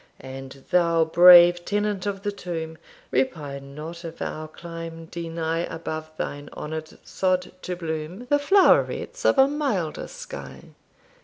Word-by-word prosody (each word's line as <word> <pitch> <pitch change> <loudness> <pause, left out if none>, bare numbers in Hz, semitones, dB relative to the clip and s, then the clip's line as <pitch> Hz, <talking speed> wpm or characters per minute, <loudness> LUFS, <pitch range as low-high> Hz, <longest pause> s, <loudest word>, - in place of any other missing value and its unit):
And 135 0 -9
thou, 170 -2 +3
brave 175 +1 +8
tenant 205 0 -1
of 195 -1 -3
the 205 - -1
tomb! 165 -5 -6 0.3
Repine 140 - -2
not 165 +3 -8
if 165 -1 -8
our 155 0 -4
clime 165 0 -8
deny, 165 -1 -3
Above 160 -2 -5
thine 145 0 -5
honour'd 155 +1 -6
sod 185 -1 0
to 180 - -4
bloom 165 +5 -5
The 290 - +5
flowerets 405 +8 +3
of - - +4
a 265 0 +7
milder 270 - -2
sky. - - -10
170 Hz, 135 wpm, -24 LUFS, 160-195 Hz, 0.3 s, brave